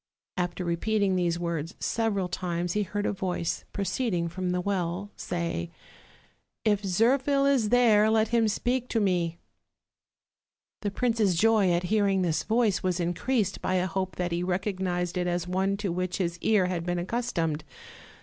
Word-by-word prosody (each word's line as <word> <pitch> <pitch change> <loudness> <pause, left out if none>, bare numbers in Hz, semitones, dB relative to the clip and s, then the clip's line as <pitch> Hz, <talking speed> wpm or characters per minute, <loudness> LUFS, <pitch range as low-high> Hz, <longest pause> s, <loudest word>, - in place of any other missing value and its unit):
'' - - -55
After 175 +1 -6
repeating 195 +3 +1
these 175 -2 +1
words 170 0 -3
several 210 -5 0
times 175 -1 -2
he 210 - +1
heard 205 +1 -2
a - - 0
voice, 180 -3 -2
proceeding 195 -4 -1
from 180 +1 -3
the 180 0 0
well, 185 +1 -2
say: 170 - -3 1.0
"If 210 -2 +3
Zirphil 260 +8 +2
is 265 -6 +3
there, 220 -3 +5
let 220 0 +3
him 230 -2 +3
speak 245 +4 -1
to 230 - +1
me." 175 -5 0 1.4
The 205 - -1
prince's 220 -3 +1
joy 210 0 +4
at 175 +1 +1
hearing 200 -3 +3
this 165 -3 +1
voice 225 -3 +1
was 185 -2 0
increased 195 +5 0
by 185 - 0
a 180 0 +2
hope 185 -1 -3
that 180 -1 -2
he 170 +1 -1
recognized 180 -1 -1
it 180 - 0
as 175 0 -1
one 190 +2 0
to 200 -3 -2
which 180 +1 -2
his 175 -2 -2
ear 210 -2 +3
had 180 -2 -2
been 175 0 -1
accustomed. 175 -6 -1
185 Hz, 165 wpm, -27 LUFS, 175-215 Hz, 1.4 s, there